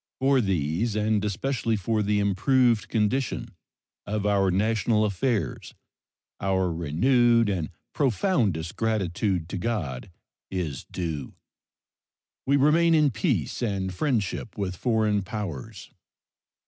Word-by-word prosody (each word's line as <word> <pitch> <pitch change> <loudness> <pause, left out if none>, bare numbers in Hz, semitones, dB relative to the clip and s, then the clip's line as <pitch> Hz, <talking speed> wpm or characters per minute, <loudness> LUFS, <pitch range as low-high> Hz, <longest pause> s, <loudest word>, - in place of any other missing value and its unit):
For 135 0 +3
these, 95 +3 0
and 105 -1 +1
especially 115 +3 -1
for 110 +2 0
the 105 0 +1
improved 115 +4 +2
condition 115 0 -1 0.5
of 105 0 -2
our 100 -2 +3
national 110 +3 +2
affairs, 105 +3 -2 0.6
our 95 -2 0
renewed 115 - +3
and 90 -6 -2 0.2
profoundest 115 - 0
gratitude 95 -5 -1
to 95 - -4
God 90 - -3 0.4
is 85 -7 -4
due. 80 -6 -5 1.1
We 140 +1 +4
remain 165 +4 +4
in 150 -3 +4
peace 110 - -1
and 95 -5 -1
friendship 110 - -2
with 95 -2 -2
foreign 110 -1 +1
powers. 95 - -6
105 Hz, 110 wpm, -26 LUFS, 95-120 Hz, 1.1 s, We